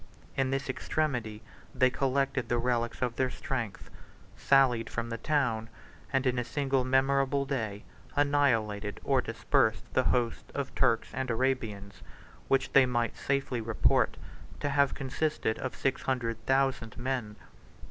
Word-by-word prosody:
93 - - +1
In 130 - +1
this 135 +1 -1
extremity 125 -6 -2 0.3
they 130 0 +4
collected 135 0 0
the 120 - +2
relics 120 0 -1
of 120 -2 -2
their 130 -1 +2
strength, 120 -6 -4 0.4
sallied 125 -4 +3
from 115 0 -4
the 115 - -2
town, 125 -8 0 0.4
and 135 0 +1
in 125 -1 +2
a - - 0
single 135 0 0
memorable 135 +1 +2
day, 110 -7 -3 0.3
annihilated 115 -8 +1
or - - +2
dispersed - - +1
the - - +2
host 120 -2 0
of 140 -2 -3
Turks 120 -4 +2
and 130 -1 -3
Arabians, 115 -5 -2 0.5
which 135 0 +1
they 135 -2 +7
might 120 -1 0
safely 135 -3 -1
report 110 -1 +2 0.4
to 145 - -1
have 140 0 +2
consisted 135 -3 -1
of 130 - -4
six 135 -1 -1
hundred 115 -4 -2
thousand 135 -4 +1
men. 120 -4 -3
130 Hz, 145 wpm, -30 LUFS, 115-135 Hz, 0.5 s, they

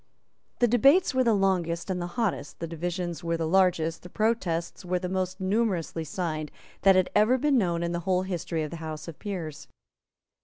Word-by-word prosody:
The 240 - +4
debates 275 - +4
were 260 0 +3
the 230 -3 +3
longest 185 -3 0
and 180 -1 -2
the 175 - -2
hottest, 210 -10 -1
the 170 - -4
divisions 175 +1 -4
were 165 0 0
the 165 - -1
largest, 170 -2 +2
the 180 - -11
protests 195 -6 -1
were 180 0 0
the 180 0 -3
most 185 0 -2
numerously 190 -5 0
signed 155 -2 -3 0.3
that 195 0 +6
had 185 -1 +2
ever 220 +5 +4
been 275 0 +3
known 170 -4 0
in 170 - -1
the 175 - -1
whole 185 +1 +1
history 175 -3 -3
of 150 - -5
the 170 - -6
House 155 -1 -6
of 165 - -9
Peers. 160 -7 -5
180 Hz, 195 wpm, -27 LUFS, 165-195 Hz, 0.3 s, that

